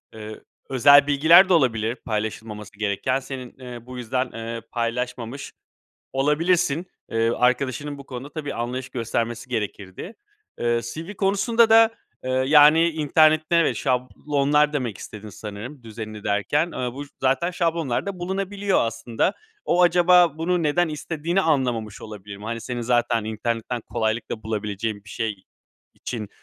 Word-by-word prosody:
ııı, 110 0 -9 0.3
özel 140 +2 +6
bilgiler 165 +6 +6
de - - +5
olabilir 115 -6 +2
paylaşılmaması 105 -1 -4
gereken. 110 +6 0
Senin, 130 -1 -8
ııı, 120 -2 -9
bu 125 0 -9
yüzden, 125 +2 -2
ııı, 115 0 -5
paylaşmamış 120 +2 -3 0.6
olabilirsin. 155 +4 +1 0.3
Iıı, 115 +1 +1
arkadaşının 135 +3 0
bu 140 - -11
konuda 130 +2 -7
tabii 150 -3 -5
anlayış 125 +2 -4
göstermesi 115 0 -3
gerekirdi. 105 - -5 0.5
Iıı, 120 0 +1
CV 160 - -7
konusunda 220 +4 +2
da, 225 0 +7 0.3
ııı, 130 0 +1
yani, 150 +3 +7
internette, 155 +1 +3
evet, 165 - +3
şablonlar 145 +3 +1
demek 125 -8 -3
istedin 105 0 -9
sanırım 110 +7 -8
düzenini 110 -1 -8
derken. 130 +11 +1
Iıı, 125 -1 -3
bu 145 +1 -6 0.2
zaten 135 +7 +1
şablonlarda 170 +1 -1
bulunabiliyor 195 +2 -1
aslında. 115 - -1 0.3
O 180 +1 +3
acaba 175 -2 +5
bunu 175 +1 0
neden 160 +3 +2
istediğini 160 +4 -2
anlamamış 125 - 0
olabilir 105 -2 -9
mi? 105 - -12
Hani, 115 +1 -4
senin 120 +1 -4
zaten 120 -2 +1
internetten 115 +2 -3
kolaylıkla 110 0 -3
bulabileceğin 105 -1 -3
bir 105 - -15
şey 105 -4 -3 0.5
için, 110 -4 -6
130 Hz, 135 wpm, -23 LUFS, 115-155 Hz, 0.6 s, da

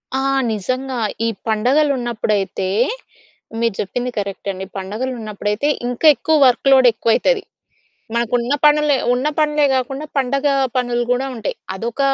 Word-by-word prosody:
ఆ! 265 - 0 0.3
నిజంగా. 255 +5 -3 0.3
ఈ - - +2 0.2
పండగలున్నప్పుడైతే, 235 -5 0 0.9
మీరు 230 -3 0
చెప్పింది 245 +6 -2
కరెక్ట్ 200 0 -5
అండి. 190 0 -6
పండగలున్నప్పుడైతే 215 +2 -3 0.2
ఇంకా 245 +6 +1
ఎక్కువ 315 - +1
వర్క్‌లోడ్ 260 +1 +4
ఎక్కువైతది. 230 - +1 0.7
మనకున్న 235 +2 0
పనులే 300 -1 +4 0.2
ఉన్న 255 +4 0
పనులే 300 -1 +2
గాకుండా, 270 +3 -2
పండగ 275 +2 0 0.3
పనులు 240 -1 0
గూడా 250 +2 +1
ఉంటాయి. 220 -3 -4 0.2
అదొక 230 +6 -5
245 Hz, 115 wpm, -19 LUFS, 220-270 Hz, 0.9 s, వర్క్‌లోడ్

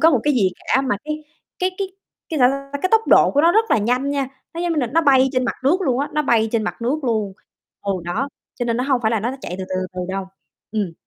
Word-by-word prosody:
có 325 +1 +6
một 255 -7 +2
cái 295 -2 +3
gì 195 -6 +3
cả. 265 - +1
Mà 250 -7 0
cái 305 0 -4 0.4
cái 370 +1 +2
cái 390 -1 -1 0.4
cái, 315 - -2
sao 250 - +6
ta, 275 +1 -5
cái 370 - +2
tốc 445 - +7
độ - - +6
của 285 - +3
nó 335 +2 +5
rất 445 +2 +2
là - - +5
nhanh 250 +6 0
nha, 275 -2 -1 0.3
nó, 340 - -4
giống 350 -1 0
như 310 - 0
là, 245 - 0
nó 315 +8 +2
bay 265 -2 +5
trên 255 -1 +1
mặt - - -1
nước 350 +8 +3
luôn 260 -7 +1
á, 285 - -1
nó 300 - +2
bay 225 -4 +2
trên 225 -2 +1
mặt 230 - -4
nước 275 +5 -1
luôn, 215 -5 0 0.5
ừ 200 -1 0
đó, 220 +11 -2 0.3
cho 245 - -3
nên 235 -1 0
nó 250 - 0
hông 265 -3 +1
phải 220 - +2
là 225 -3 +1
nó 235 +3 -1
n - - -5
chạy 180 - -5
từ 190 - -3
từ, 185 - -3
từ 185 - -1
từ 185 - -3
đâu, 190 0 -3 0.5
ừm. 200 -6 -1
260 Hz, 300 wpm, -21 LUFS, 225-300 Hz, 0.5 s, tốc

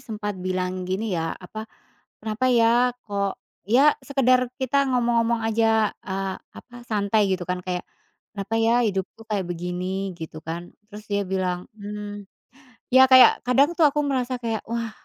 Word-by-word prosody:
sempat 210 -2 -5
bilang 185 0 -3
gini 200 +3 -2
ya, 165 -2 -2
apa, 215 +4 -9 0.5
"Kenapa 220 +4 -1
ya, 240 +1 +3
kok" 200 -2 -2 0.3
ya, 275 +7 +6
sekedar 255 -2 +2
kita 275 +1 +1
ngomong-ngomong 235 -2 +1
aja, 225 -1 +2
eee, 195 0 -3 0.2
apa, 245 - -14
santai 205 -1 +1
gitu 185 -1 -2
kan, 180 +1 -3
kayak, 180 0 -4 0.5
"Kenapa 205 +2 -3
ya 225 +2 +3
hidupku 195 +2 -4
kayak 205 -3 -1
begini?" 180 +2 -4
Gitu 160 -1 -8
kan, 170 +2 -7 0.2
terus 210 0 -11
dia 200 0 +1
bilang 185 -1 -2
mmm, 205 0 -7 0.7
ya 260 +1 +7
kayak 255 -1 +7
kadang 275 +5 +4
tuh 315 - +7
aku 295 +1 0
merasa 260 -3 -1
kayak, 225 -2 -2
"Wah, 230 0 -3
215 Hz, 150 wpm, -24 LUFS, 190-240 Hz, 0.7 s, ya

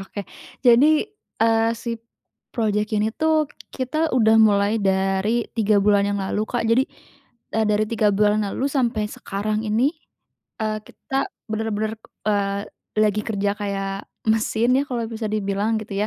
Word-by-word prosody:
oke. 195 +1 -6 0.4
Jadi, 290 - +6 0.4
eee, 225 0 +3
si 230 0 -5 0.5
project 210 -2 0
ini 210 +1 +2
tuh 315 0 +1 0.2
kita 310 +4 -1
udah 225 -3 +4
mulai 205 0 +4
dari 195 +4 +1
3 215 -1 +3
bulan 200 0 +4
yang 200 0 -1
lalu, 195 +2 -1
Kak, 245 -2 -1
jadi, 250 +3 +4 0.7
eee, 220 -1 +2
dari 210 +1 +2
3 215 -2 +2
bulan 210 +1 +3
lalu 260 - -3
sampai 235 -6 0
sekarang 210 +2 -3
ini, 230 +8 +2 0.7
eee, 215 0 -1
kita 270 0 -3 0.2
bener-bener, 220 0 -2 0.3
eee, 200 -1 0 0.4
lagi 210 0 +2
kerja 200 -2 0
kayak 195 -1 -3 0.3
mesin 225 +2 +2
ya, - - +1
kalau 235 -3 -2
bisa 220 -1 -4
dibilang 210 +1 0
gitu 205 -2 -7
215 Hz, 140 wpm, -22 LUFS, 205-230 Hz, 0.7 s, Jadi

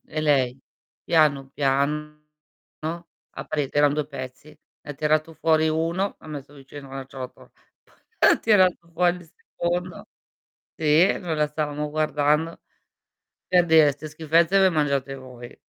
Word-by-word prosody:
e 155 - -4
lei 135 -4 +1 0.4
piano 150 -5 +2
piano 150 +2 -1 1.2
ha - - -5
pre 145 -3 -2
eran 145 0 +3
2 150 -2 -2
pezzi, 130 0 -9
ne 150 0 -15
ha 145 - -6
tirato 155 +2 0
fuori 160 0 +2
1 165 +5 -1
l'ha - - -16
messo 145 -1 -8
vicino 140 0 -12
la 135 0 -6
ciotola, 130 -2 -10 0.7
poi - - +5
tirato 190 -5 +4 0.2
fuori 180 +1 +2
il 165 -2 -16
secondo 175 +1 -4 0.7
sì, 160 +4 +3
noi 170 -3 -3
la 150 0 +1
stavamo 150 0 -3
guardando, 155 +1 0 0.9
per 180 -1 +4
dire: 160 -3 +5
"'Ste 145 +2 -9
schifezze 165 +4 +2
le 190 -1 +5
mangiate 140 -4 0
voi". 125 -2 -11
150 Hz, 140 wpm, -24 LUFS, 140-165 Hz, 1.2 s, poi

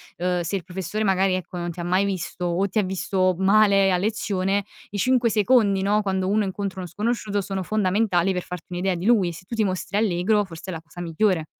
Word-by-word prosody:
ehm, 180 0 -1
se 175 +4 -2
il 185 - -3
professore 190 +4 -4
magari, 190 -1 +2
ecco, 185 -1 -4
non 175 0 -3
ti 175 - -11
ha - - -4
mai 185 +3 +2
visto 180 -2 -3
o 175 +3 +1
ti 215 - 0
ha - - +2
visto 185 -1 0
male 195 0 +4
a 180 - +3
lezione, 200 -1 0 0.3
i 205 - -4
5 250 +1 +3
secondi, 210 -3 +3
no, 205 +2 +2
quando 190 -1 -1
uno 210 +1 +2
incontra 190 0 -4
uno 180 - -5
sconosciuto, 210 +1 -1
sono 190 0 -4
fondamentali 195 -2 +1
per 180 -1 -2
farti 180 -2 -8
un'idea 180 +1 -1
di 175 +3 -5
lui. 200 -7 +3
Se 170 - -11
tu 230 - -6
ti 220 - +2
mostri 185 +1 -2
allegro 205 0 +2
forse 170 +1 -10
è - - -3
la 165 - -6
cosa 175 +2 -11
migliore. 170 0 +1
190 Hz, 230 wpm, -24 LUFS, 180-205 Hz, 0.3 s, male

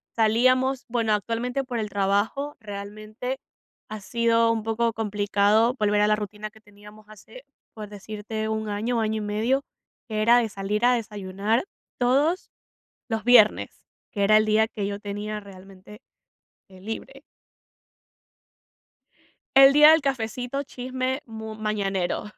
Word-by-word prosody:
Salíamos 255 +4 +2
bueno, 230 -2 +1
actualmente, 235 +5 -2
por 250 -3 -4
el 210 -1 -3
trabajo, 205 +9 -1
realmente 215 +4 -7 0.5
ha 215 - -6
sido 230 +1 +2
un 225 -1 -1
poco 225 +1 0
complicado 210 +1 +2
volver 210 -1 +2
a 210 - +4
la 215 - +3
rutina 210 0 -6
que 220 - -20
teníamos 210 0 -17
hace, 220 +5 -14 0.3
por 210 -2 -8
decirte, 215 +1 -6
1 220 0 -3
año, 225 +4 -1
año 220 0 -1
y - - -4
medio, 225 +7 0 0.5
que 215 -1 -2
era 235 +2 +6
de 230 -2 -1
salir 205 +3 -2
a 250 - +5
desayunar 210 - -2 0.4
todos 280 +9 +1 0.6
los 225 -2 -3
viernes, 235 -3 +4 0.3
que 205 - -2
era 215 +2 +5
el 215 - +2
día 215 +1 +3
que 205 -3 -4
yo 200 0 -5
tenía 210 +1 -5
realmente, 195 +1 -14 0.7
eh, 190 -1 -16
libre. 225 +7 -7 2.3
El 270 0 +9
día 300 +2 +8
del 320 0 +4
cafecito, 255 +1 -3
chisme 260 +1 -4
mu 220 -1 -8
mañanero. 200 -4 -2
220 Hz, 140 wpm, -25 LUFS, 210-245 Hz, 2.3 s, El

